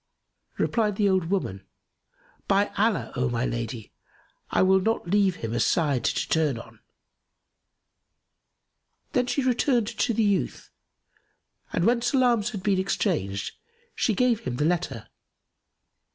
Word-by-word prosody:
Replied 215 -3 +1
the 205 0 +2
old 190 -3 +2
woman, 100 - -2 0.8
"By 200 +1 +2
Allah, 200 - 0
O 125 0 0
my 120 +1 -1
lady, 115 -2 -4 0.6
I - - +2
will 190 0 +5
not 225 -2 -1
leave 195 -1 +2
him 115 0 -5
a 120 - 0
side 145 -7 +1
to - - 0
turn 155 -6 +1
on!" 115 - -12 2.3
Then 250 -1 +2
she 275 +2 0
returned 250 -1 +2
to 220 - -1
the 225 0 +1
youth 200 -2 -1 1.0
and, 170 - 0
when 235 +1 +3
salams 240 -4 +2
had 205 -6 -6
been 195 -2 +2
exchanged, 155 - -1 0.4
she 220 - 0
gave 245 0 +2
him 125 - -4
the 150 - 0
letter. 165 -10 -1
190 Hz, 135 wpm, -26 LUFS, -, 2.3 s, will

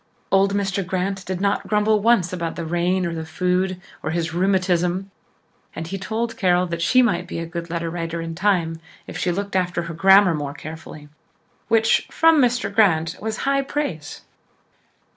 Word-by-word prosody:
Old 195 +1 +3
Mr. 195 -1 -1
Grant 185 +1 -2
did 185 -1 -3
not 200 +1 0
grumble 210 0 +2
once 200 -6 +3
about 170 -2 -3
the 170 - -5
rain 175 +2 0
or 170 - -2
the 160 -1 -4
food 180 +3 -1 0.2
or 155 - -3
his 165 0 -2
rheumatism 185 0 +1 0.6
and 165 - -5
he 195 - -4
told 230 +4 -3
Carol 180 -2 +2
that 170 -1 -4
she 255 +9 +4
might 180 -7 0
be - - -5
a 165 - -3
good 170 0 -6
letter 170 0 -3
writer 165 0 -4
in 165 0 -5
time 170 -3 0 0.3
if - - -9
she 180 - 0
looked 200 +2 -4
after 180 -2 0
her 170 -1 -6
grammar 190 +2 +6
more 145 -2 -4
carefully 155 -1 -9 0.6
which, 225 0 +3
from 325 -2 +4
Mr. 245 -4 +1
Grant, 165 -6 +3
was 220 0 -3
high 275 0 +2
praise. 270 - -4
180 Hz, 180 wpm, -22 LUFS, 170-200 Hz, 0.6 s, grammar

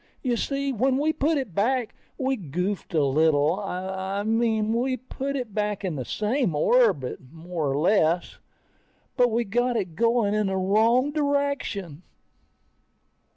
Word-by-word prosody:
You 250 -3 +1
see, 275 +3 -2
when 260 +3 +1
we 305 +3 +1
put 310 +2 +1
it 260 -10 -4
back, 235 +5 0 0.2
we 265 0 0
goofed 180 - -4
a 155 - +3
little. 155 +4 +2
I 190 0 -3
mean, 220 0 +1
we 255 +2 0
put 265 +3 -5
it 245 -6 -4
back 210 -1 -2
in 175 -4 -2
the 130 -3 -4
same 215 - -1
orbit, 190 - +2
more 165 -2 -4
or 135 - 0
less, 175 0 +1 0.8
but 245 -2 +4
we 235 +1 0
got 240 +3 0
it 180 -6 -3
going 230 0 +2
in 210 -1 +1
the 190 0 -1
wrong 225 +8 +3
direction. 280 - -1
215 Hz, 150 wpm, -25 LUFS, 180-255 Hz, 0.8 s, but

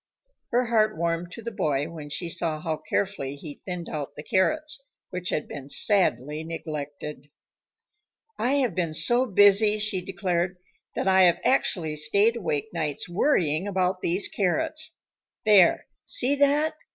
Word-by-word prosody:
Her 245 +1 +1
heart 220 -5 +1
warmed 170 +1 -2
to 230 - -9
the 235 - -5
boy 145 -7 -1
when 160 -3 -9
she 170 +4 -4
saw 165 -2 -1
how 160 -1 -3
carefully 145 -10 -3
he 145 0 -10
thinned 180 -2 -5
out 145 -1 -6
the 150 - -8
carrots, 295 - 0 0.3
which 180 0 -4
had 150 - -2
been 140 -1 -8
sadly 150 - +3
neglected. 150 -3 -7 1.1
"I 255 -6 0
have 245 -7 0
been 165 -3 -2
so 245 +8 +3
busy," 205 +1 +5
she 210 -3 -1
declared, 180 -1 -2 0.4
"that - - -2
I 190 -1 +6
have 175 - +3
actually 165 - +1
stayed 200 +9 +3
awake 205 -2 -3
nights 155 -4 -3
worrying 175 - +1
about 185 -1 -1
these 180 +4 +3
carrots. 310 - -1 0.5
There 200 -5 +5 0.2
see 260 +3 +3
that?" 285 +2 +2
180 Hz, 150 wpm, -25 LUFS, 155-215 Hz, 1.1 s, I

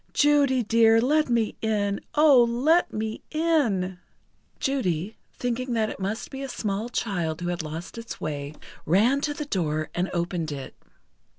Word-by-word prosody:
Judy 285 -4 +3
dear, 225 +1 +5
let 300 +4 +2
me 230 -2 +1
in! 205 -2 0
Oh 295 -5 +7
let 305 +9 +3
me 220 0 -4
in!" 240 - +1 0.6
Judy, 205 - -1 0.2
thinking 245 +1 -2
that 220 -2 0
it - - -9
must 200 +4 -3
be 270 - -6
a 275 - -5
small 215 -1 -3
child 175 -9 -2
who 175 0 -3
had 175 -1 -2
lost 160 +7 -7
its 230 0 -8
way, 145 0 -4 0.3
ran 225 - +3
to 295 0 -1
the 300 - -4
door, 155 - -1
and 180 +2 -1
opened 170 -2 -2
it. 140 -2 -6
220 Hz, 160 wpm, -25 LUFS, 180-265 Hz, 0.6 s, Oh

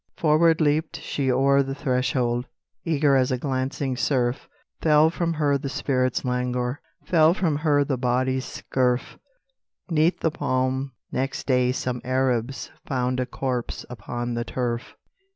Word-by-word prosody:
Forward 160 +1 +4
leaped 155 +1 +1
she 135 -2 -1
o'er 140 +2 +4
the 135 0 -3
threshold, 125 -3 0 0.4
Eager 150 -4 +2
as 130 -1 +2
a 130 - +1
glancing 130 0 -2
surf; 125 -1 0 0.3
Fell 155 0 +5
from 170 -1 -1
her 145 -2 +2
the 135 - -4
spirit's 130 -2 0
languor, 125 +1 -1 0.2
Fell 165 0 +4
from 160 -7 0
her 145 -2 +3
the 135 -3 -2
body's 130 +1 0
scurf; 125 -1 -1 0.7
'Neath 160 +2 +2
the 160 - +1
palm 130 -1 -1 0.2
next 135 +1 -2
day 125 -2 +3
some 125 -1 -3
Arabs 130 0 -1 0.2
Found 125 -1 0
a 125 - -1
corpse 125 -1 -3
upon 120 +1 -4
the 120 0 -1
turf. 120 -1 -3
130 Hz, 140 wpm, -24 LUFS, 125-145 Hz, 0.7 s, Fell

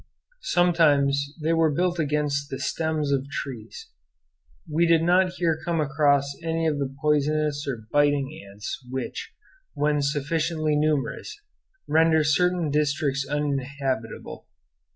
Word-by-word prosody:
Sometimes 145 -5 +3
they 160 +2 +2
were 165 -1 +3
built 175 +3 0
against 145 -2 0
the 135 - -4
stems 155 -2 -1
of 140 0 0
trees. 120 -6 -7 0.8
We 165 +2 +2
did 165 -1 +4
not 180 +1 +3
here 165 -3 0
come 170 0 -1
across 140 -1 +2
any 165 0 -1
of 150 -2 0
the 135 -1 -2
poisonous 150 0 +1
or 120 -5 -4
biting 145 -1 +1
ants 100 +5 -7
which, 130 0 -5 0.4
when 150 0 +1
sufficiently 155 +2 0
numerous, 150 - -1 0.5
render 160 0 +4
certain 175 +1 +2
districts 140 -2 0
uninhabitable. 140 -5 -3
150 Hz, 120 wpm, -25 LUFS, 140-160 Hz, 0.8 s, did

